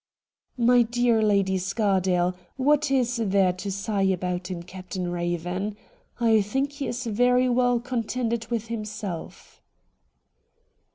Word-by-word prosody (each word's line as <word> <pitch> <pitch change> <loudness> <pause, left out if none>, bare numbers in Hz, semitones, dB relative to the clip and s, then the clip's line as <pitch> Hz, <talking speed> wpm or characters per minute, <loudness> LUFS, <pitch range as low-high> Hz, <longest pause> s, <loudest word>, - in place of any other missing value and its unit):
' - - -49
My 245 -1 +6
dear 235 -1 +2
Lady 200 -3 +2
Scardale, 185 -2 +1 0.2
what 295 +2 +2
is 250 -3 +1
there 195 -4 +2
to 190 +2 -5
sigh 200 +1 -2
about 180 -1 -1
in 175 -2 -5
Captain 185 0 -5
Eaven? 175 +4 -2 0.4
I 225 -2 +4
think 270 +8 -1
he 285 -1 -5
is 245 +1 -3
very 250 +3 +3
well 245 -1 +2
contented 235 -1 -2
with 230 -2 -2
himself.' 210 -6 -6
215 Hz, 125 wpm, -25 LUFS, 185-245 Hz, 0.4 s, My